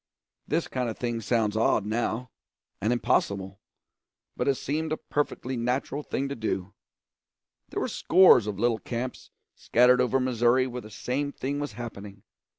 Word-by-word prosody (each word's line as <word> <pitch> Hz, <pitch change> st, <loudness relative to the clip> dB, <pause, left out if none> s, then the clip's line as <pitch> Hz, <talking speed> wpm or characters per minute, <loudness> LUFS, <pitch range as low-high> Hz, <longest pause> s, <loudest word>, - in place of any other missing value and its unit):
This 165 Hz, +2 st, 0 dB
kind 125 Hz, -2 st, -2 dB
of 110 Hz, -, -6 dB
thing 120 Hz, -2 st, -2 dB
sounds 110 Hz, -1 st, +1 dB
odd 110 Hz, -2 st, +2 dB
now, 115 Hz, +2 st, -2 dB, 0.5 s
and 110 Hz, +4 st, +1 dB
impossible, 100 Hz, -5 st, 0 dB, 0.8 s
but -, -, -2 dB
it 140 Hz, -, +3 dB
seemed 155 Hz, +4 st, -2 dB
a 155 Hz, -, 0 dB
perfectly 130 Hz, -3 st, -2 dB
natural 125 Hz, +4 st, -1 dB
thing 140 Hz, -1 st, -2 dB
to 140 Hz, -, -4 dB
do. 100 Hz, -4 st, -3 dB, 1.0 s
There -, -, -3 dB
were -, -, 0 dB
scores 170 Hz, -, +5 dB
of 105 Hz, -2 st, -3 dB
little 115 Hz, +1 st, +1 dB
camps 125 Hz, +1 st, -5 dB, 0.2 s
scattered 125 Hz, +1 st, +4 dB
over 125 Hz, +1 st, +2 dB
Missouri 125 Hz, 0 st, +3 dB
where 125 Hz, -1 st, -5 dB
the 110 Hz, -, -11 dB
same 135 Hz, +6 st, -2 dB
thing 140 Hz, +1 st, -3 dB
was 145 Hz, 0 st, -4 dB
happening. 105 Hz, -4 st, -8 dB
120 Hz, 155 wpm, -27 LUFS, 110-130 Hz, 1.0 s, scores